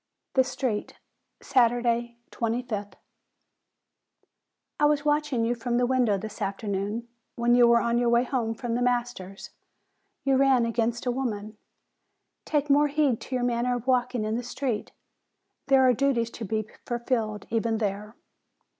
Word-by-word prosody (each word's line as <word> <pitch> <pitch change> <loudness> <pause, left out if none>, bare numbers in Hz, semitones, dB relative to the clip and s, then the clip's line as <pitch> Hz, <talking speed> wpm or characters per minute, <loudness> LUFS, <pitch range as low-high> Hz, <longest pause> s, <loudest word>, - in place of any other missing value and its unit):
THE 260 - +5
STREET 250 -4 -3 0.5
Saturday, 240 -2 +2
25th. 225 -4 -3 1.9
I 295 - +4
was 295 0 +2
watching 295 -5 +1
you 235 - +1
from 240 0 -2
the 245 - +3
window 245 -5 +2
this 215 +3 -8
afternoon, 200 +3 -3 0.3
when 240 0 +2
you 245 -1 +6
were 235 0 +5
on 235 0 +1
your 240 -1 +2
way 235 +1 +4
home 240 -3 -2
from 240 0 -4
the 245 - 0
master's; 240 -6 -2 0.7
you 270 -1 +3
ran 265 -3 +4
against 230 +1 -1
a 250 - +1
woman. 220 -4 -3 0.9
Take 295 -1 0
more 290 +1 +4
heed 285 -5 +1
to 260 - -5
your 250 - 0
manner 245 0 +1
of 245 -1 -5
walking 250 -2 +1
in 215 +1 -1
the - - -2
street. 240 -2 -3 0.8
There 265 -1 +5
are 250 - +5
duties 240 -2 +1
to 230 - -6
be 215 +1 -2 0.2
fulfilled 235 -4 -2
even 225 0 0
there. 210 +1 -3
240 Hz, 150 wpm, -26 LUFS, 225-255 Hz, 1.9 s, you